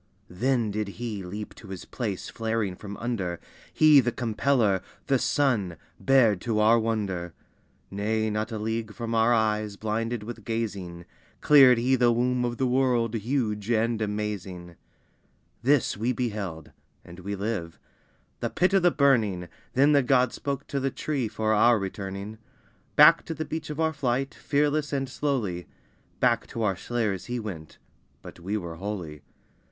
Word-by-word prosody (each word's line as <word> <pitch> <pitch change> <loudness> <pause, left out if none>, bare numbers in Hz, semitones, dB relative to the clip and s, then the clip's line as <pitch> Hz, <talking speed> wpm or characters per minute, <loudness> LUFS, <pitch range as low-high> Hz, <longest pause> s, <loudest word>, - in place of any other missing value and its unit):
Then 120 +3 0
did 105 0 -2
He 115 -4 -4
leap 105 +4 -7
to 110 - -14
His 95 -2 -7
place 105 -7 -4
flaring 110 -4 -2
from 100 +1 -8
under, 100 -8 -3 0.3
He 155 -2 +6
the 120 -2 +1
Compeller, 115 -4 +1 0.2
the 135 -2 +2
Sun, 110 - +1 0.2
bared 115 -8 +4
to 115 -2 -1
our 110 +2 +5
wonder. 100 -7 -2 0.6
Nay, 110 +2 -1
not 110 +2 -2
a 110 - -3
league 110 0 -3
from 115 -1 -4
our 115 +1 +3
eyes 110 -2 +1
blinded 110 +2 -2
with 110 0 -8
gazing, 100 -7 -4 0.3
Cleared 135 -4 +7
He 125 +3 +2
the 120 -1 +4
womb 125 +1 +1
of 120 0 -3
the 130 - +1
world, 125 -3 +1
huge 110 -2 -2
and 115 0 +1
amazing! 100 -5 -4 0.9
This 135 +1 +2
we 115 +5 -1
beheld 105 -10 -4 0.3
(and 85 +1 -12
we 100 +3 -4
live) 100 -5 -4 0.6
the - - -2
Pit 185 +2 +1
of 195 - +5
the 175 - +5
Burning, 110 - +2 0.2
Then 140 +3 +4
the 145 -1 +5
God 125 -1 +2
spoke 140 -1 -4
to 140 - -3
the 135 0 0
tree 135 -2 -2
for 110 0 -1
our 115 +2 +5
returning; 100 +2 -5 0.6
Back 165 +3 +7
to 165 - -5
the 155 - -4
beach 160 -1 -5
of 150 0 -5
our 160 0 +1
flight, 135 -1 -1
fearless 150 +1 0
and 135 -1 -1
slowly, 120 -9 -2 0.5
Back 120 -2 +2
to 115 - -4
our 100 -3 +1
slayers 105 -2 -2
he 120 0 -3
went: 90 -9 -8 0.5
but - - -11
we 100 +5 -2
were 85 -4 -6
holy. 90 -6 -5
115 Hz, 160 wpm, -26 LUFS, 100-125 Hz, 0.9 s, Cleared